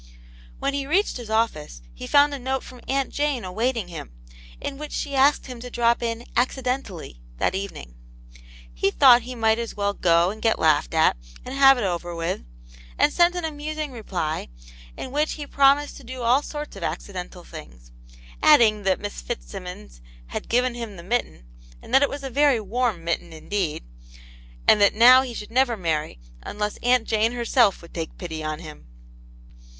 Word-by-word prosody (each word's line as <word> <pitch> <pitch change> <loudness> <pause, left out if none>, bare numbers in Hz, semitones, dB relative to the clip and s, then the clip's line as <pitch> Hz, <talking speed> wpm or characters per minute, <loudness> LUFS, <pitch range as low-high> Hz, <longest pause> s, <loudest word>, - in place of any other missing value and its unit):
When 275 - -1
he 275 -1 -3
reached 375 +4 +1
his 240 -3 -9
office 155 - -1
he - - -8
found 290 0 +5
a 280 - -4
note 265 +1 -2
from 250 -1 -12
Aunt 270 0 0
Jane 285 -6 -1
awaiting 225 +2 -1
him, 165 - -8 0.5
in 275 0 -5
which 300 0 -7
she 285 - -3
asked 275 +2 +3
him 250 -3 -8
to 250 +1 -8
drop 235 0 +1
in 230 0 -3
"accidentally" 250 - -2 0.2
that - - 0
evening. 190 - -6 0.8
He - - +1
thought 245 - +6
he 250 +2 -8
might 225 -1 +2
as 230 -1 -5
well 200 0 0
go 170 -1 +3
and 215 +1 -10
get 225 -1 +2
laughed 155 0 +2
at, 160 - +4 0.3
and 255 - -6
have 270 -1 +6
it 245 - -2
over 175 -2 -3
with, 165 - -2 0.6
and - - +3
sent 345 +1 +4
an 355 -2 -2
amusing 305 -1 -4
reply, 180 -9 -4 0.5
in 260 - -6
which 300 +2 0
he 295 - -6
promised 280 +1 +3
to 280 - -13
do 255 0 -7
all 245 +4 +4
sorts 295 -2 -7
of 195 - -9
accidental 180 +1 -5
things, - - -12 0.5
adding 230 -8 +5
that 190 -2 +1
Miss 205 0 -6
Fitzsimmons 180 - -8 0.3
had - - -6
given 250 +1 +2
him 230 -4 -7
the 170 - -10
mitten, 195 - -2 0.3
and - - -13
that 270 - +6
it 285 - +3
was 280 0 -6
a 270 - -5
very 280 -2 +3
warm 220 -4 -1
mitten 170 0 -2
indeed, 160 - -3 0.8
and 210 - +6
that 200 - +5
now 250 +3 +8
he 250 -3 -6
should 210 0 -7
never 245 -1 +2
marry 155 - -2 0.2
unless 210 - -4
Aunt 245 -1 +2
Jane 220 +2 +1
herself 235 -5 +2
would 170 - -14
take 165 -2 -5
pity 160 -3 -6
on 155 0 -3
him. 155 - -11
230 Hz, 185 wpm, -24 LUFS, 180-265 Hz, 0.8 s, now